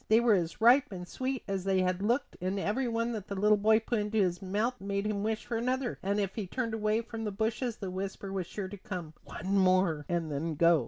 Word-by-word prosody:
They 220 +1 +6
were 235 -2 +4
as 170 -4 0
ripe 245 +3 +6
and 180 -2 -6
sweet 260 +3 -3
as 195 -2 -2
they 190 -1 +2
had 185 0 0
looked 235 +7 0
and 190 +2 -1
every 220 +7 0
one 230 0 0
that 215 -4 -5
the 200 - -4
little 210 +2 +4
boy 220 +2 +4
put 225 0 -1
into 210 +1 -1
his 180 -4 +2
mouth 210 +6 -1
made 200 +1 -2
him 210 -1 -1
wish 220 +1 -2
for 240 -2 -2
another; 250 +1 -1
and 200 +2 0
if 195 -2 -1
he 210 -4 -4
turned 230 +2 -2
away 215 0 +1
from 225 -1 -6
the 215 - -1
bushes 225 +3 -1
the 195 -4 -5
whisper 195 +1 -5
was 185 -3 -2
sure 200 -1 -4
to 205 +2 -8
come: 180 -5 -6
"One 190 +4 -3
more 185 -5 +3
and 170 -3 -1
then 155 +3 -2
go." 170 +1 +5
205 Hz, 250 wpm, -31 LUFS, 185-225 Hz, -, They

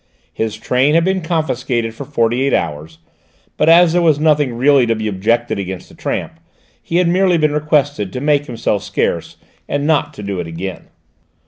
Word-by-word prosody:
His 110 -1 -3
train 130 +6 +1
had 165 0 +3
been 190 0 0
confiscated 130 -8 -2
for 140 +5 -8
forty 120 -3 0
eight 135 0 +2
hours, 80 +2 -4 0.6
but - - +2
as 170 0 +6
there 175 - +3
was 155 -4 +3
nothing 150 -5 +2
really 135 0 +4
to 115 - +1
be 110 0 -3
objected 110 +3 0
against 95 -2 -6
the - - -16
tramp, - - -4 0.4
he 165 - -5
had 180 0 +3
merely 180 0 +3
been 155 -2 +1
requested 145 -8 0
to - - -3
make 145 +1 +1
himself 110 -4 -1
scarce, - - -2 0.3
and 145 0 -1
not 150 -1 +1
to 105 - -8
do 100 -2 -4
it 85 - -4
again. 90 +3 -6
135 Hz, 190 wpm, -17 LUFS, 110-155 Hz, 0.6 s, as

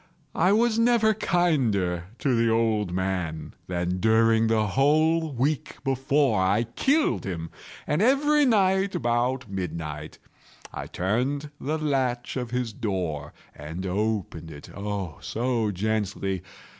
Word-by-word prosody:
I 180 +4 +3
was 225 +1 +3
never 230 -2 +4
kinder 125 - +1
to 135 - 0
the 115 -1 +3
old 110 -4 +1
man 90 -5 -3
than 90 0 -2
during 110 +1 +4
the 110 -1 +2
whole 155 +5 +2
week 140 +3 -1
before 135 -4 +2
I 100 +5 +2
killed 275 - +1
him. 85 -4 -5 0.3
And 150 - 0
every 290 +5 +4
night, 195 -5 +3
about 125 -3 0
midnight, 80 -5 -5 0.6
I - - -5
turned 130 - -1
the 155 +4 -1
latch 130 -5 -1
of 125 -3 -3
his 125 -2 -2
door 90 -9 -3 0.2
and 80 +5 -7
opened 95 -4 -2
it—oh, 95 +3 -6
so 115 -2 -1
gently! 100 -2 -2
115 Hz, 120 wpm, -26 LUFS, 95-150 Hz, 0.6 s, never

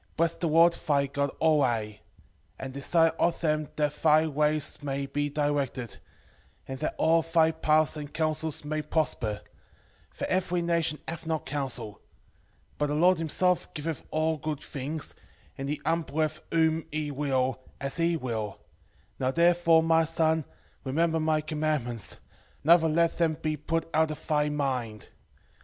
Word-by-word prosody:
4:19 - - -36
Bless 170 0 +2
the 170 - -2
Lord 165 +2 +5
thy 140 -4 +1
God 140 0 -1
alway, 120 -10 +1 0.6
and 130 0 -6
desire 165 +4 +3
of 170 -1 +2
him 155 -2 0
that 150 -1 0
thy 155 0 +5
ways 150 0 +1
may 140 -1 -2
be 145 +1 -2
directed, 145 -5 -2 0.7
and 130 0 -6
that - - -2
all 165 +1 +4
thy 165 0 +3
paths 155 -1 +2
and 145 -1 -7
counsels 155 -1 -2
may 155 +1 -2
prosper: 135 -9 -1 0.7
for - - -5
every 180 -2 0
nation 165 -2 +1
hath 165 0 -5
not 160 -1 -2
counsel; 130 -7 -4 0.8
but 150 - +1
the 145 - -1
Lord 175 +2 +4
himself 180 +3 +1
giveth 160 0 -4
all 155 0 0
good 150 -1 -4
things, 145 +3 -5 0.4
and 135 +1 -5
he 150 0 -2
humbleth 155 -1 -1
whom 160 -1 +2
he 150 -1 -2
will, 130 -2 0 0.2
as 140 +2 -3
he 170 0 +2
will; 110 -7 -4 0.6
now 130 - +1
therefore, 170 +1 +4
my 165 0 +4
son, 160 -1 +1 0.4
remember 160 +4 +1
my 155 -1 +1
commandments, 150 -7 -2 0.5
neither 165 +1 +5
let 170 +2 +1
them 165 -2 +3
be 155 -1 -1
put 165 +2 -2
out 160 0 +3
of 155 - -7
thy 150 -1 +1
mind. 130 -7 -3
155 Hz, 150 wpm, -28 LUFS, 140-165 Hz, 0.8 s, Lord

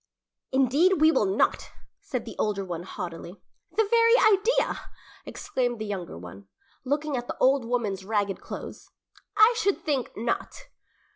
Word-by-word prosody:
"Indeed, 275 +8 +3
we 315 +1 +6
will 210 - +2
not!" 190 +2 0 0.3
said - - -5
the - - -8
older 200 -2 -1
one 175 -2 -5
haughtily. 175 0 -7 0.3
"The 445 - +2
very 460 +1 +5
idea!" 435 +1 +2 0.4
exclaimed 255 -12 -2
the 215 - -5
younger 190 - -5
one, 90 +3 -11 0.4
looking 290 +2 -1
at 245 -1 -4
the - - -5
old 265 -1 +3
woman's 220 -6 -2
ragged 205 -1 -1
clothes. - - -8 0.5
"I 435 +3 +7
should 400 -1 0
think 275 -5 -2
not!" 230 +2 -3
245 Hz, 145 wpm, -26 LUFS, 195-315 Hz, 0.5 s, I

